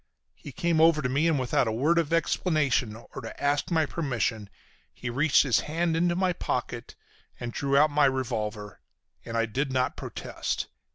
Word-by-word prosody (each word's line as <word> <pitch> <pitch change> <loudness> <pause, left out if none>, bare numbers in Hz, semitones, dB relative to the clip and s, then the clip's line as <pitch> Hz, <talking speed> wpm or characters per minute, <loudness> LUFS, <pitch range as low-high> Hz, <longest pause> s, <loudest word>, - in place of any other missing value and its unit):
He 145 - -11
came 170 -1 +1
over 160 -2 +5
to 125 - 0
me, 145 +5 +2
and 160 -3 +2
without 125 -1 +1
a - - 0
word 150 +10 +2
of 165 -2 -1
explanation 155 - +1
or 115 - -10
to - - -9
ask 145 +3 0
my 160 -3 +2
permission 120 - -2 0.4
he 120 - -6
reached 140 +4 +4
his 135 -5 +2
hand 165 +2 -1
into 175 +1 +2
my 185 0 +1
pocket 125 -6 -4 0.4
and 120 -1 -5
drew 140 -1 +1
out 150 +1 +5
my 145 0 +4
revolver, 110 -6 -2 0.4
and 115 - -4
I 115 - +2
did 135 +5 -2
not 130 -1 0
protest. - - -4
140 Hz, 180 wpm, -27 LUFS, 120-160 Hz, 0.4 s, over